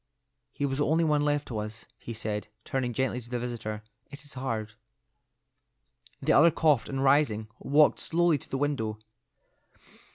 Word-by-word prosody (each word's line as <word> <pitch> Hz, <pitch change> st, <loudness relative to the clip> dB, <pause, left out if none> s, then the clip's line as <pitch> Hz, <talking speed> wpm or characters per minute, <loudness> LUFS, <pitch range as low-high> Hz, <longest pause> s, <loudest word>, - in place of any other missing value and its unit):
"He 145 Hz, -, -2 dB
was 135 Hz, 0 st, -2 dB
the 145 Hz, -, +2 dB
only 160 Hz, +2 st, +3 dB
one 150 Hz, -2 st, +2 dB
left 145 Hz, 0 st, 0 dB
to 110 Hz, -4 st, -3 dB
us," 110 Hz, +1 st, -6 dB
he -, -, -8 dB
said, 110 Hz, -1 st, -4 dB, 0.2 s
turning 130 Hz, -2 st, -1 dB
gently 125 Hz, 0 st, -1 dB
to 120 Hz, -, -14 dB
the 125 Hz, -, -2 dB
visitor. 115 Hz, -3 st, -4 dB, 0.3 s
"It 140 Hz, -, -11 dB
is 145 Hz, -, -11 dB
hard." 115 Hz, -5 st, -3 dB, 1.5 s
The -, -, +3 dB
other 165 Hz, +3 st, +7 dB
coughed, 150 Hz, -5 st, +2 dB
and 135 Hz, 0 st, -1 dB
rising, 135 Hz, -6 st, +3 dB
walked 150 Hz, +2 st, +4 dB
slowly 170 Hz, -2 st, +2 dB
to -, -, -11 dB
the 135 Hz, -, -2 dB
window. 130 Hz, -7 st, -1 dB
135 Hz, 165 wpm, -28 LUFS, 110-145 Hz, 1.5 s, other